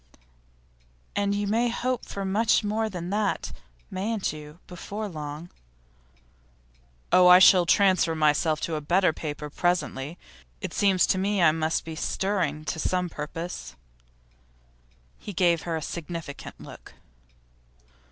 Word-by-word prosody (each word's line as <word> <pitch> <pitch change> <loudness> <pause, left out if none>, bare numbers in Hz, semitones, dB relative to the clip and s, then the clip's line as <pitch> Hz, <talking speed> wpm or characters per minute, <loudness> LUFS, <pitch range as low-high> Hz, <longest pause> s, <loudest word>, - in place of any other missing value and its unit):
'And 200 0 +1
you 205 0 -1
may 230 +4 +1
hope 250 +1 -2
for 200 -1 -5
much 215 +4 +2
more 220 +1 -1
than 180 -2 -6
that, 205 -1 -1 0.4
mayn't 200 -1 -2
you, 150 +1 -10
before 200 +4 -6
long?' 155 -1 -7 1.6
'Oh, 180 0 +6
I 180 0 +10
shall 185 -1 +7
transfer 185 -4 +3
myself 155 0 +2
to 165 - -2
a 155 - -2
better 175 +3 +2
paper 150 -1 -5
presently. 170 -3 -1 0.4
It - - -5
seems 190 -3 +3
to 190 - +1
me 200 +1 0
I 170 -3 +6
must 160 0 -1
be 160 -1 -6
stirring 170 -4 -1
to 160 - -3
some 180 +1 0
purpose.' 165 +3 -6 1.4
He 205 - -8
gave 170 -2 +2
her 165 - 0
a 160 - -3
significant 165 -3 -7
look. - - -12
180 Hz, 130 wpm, -26 LUFS, 155-200 Hz, 1.6 s, I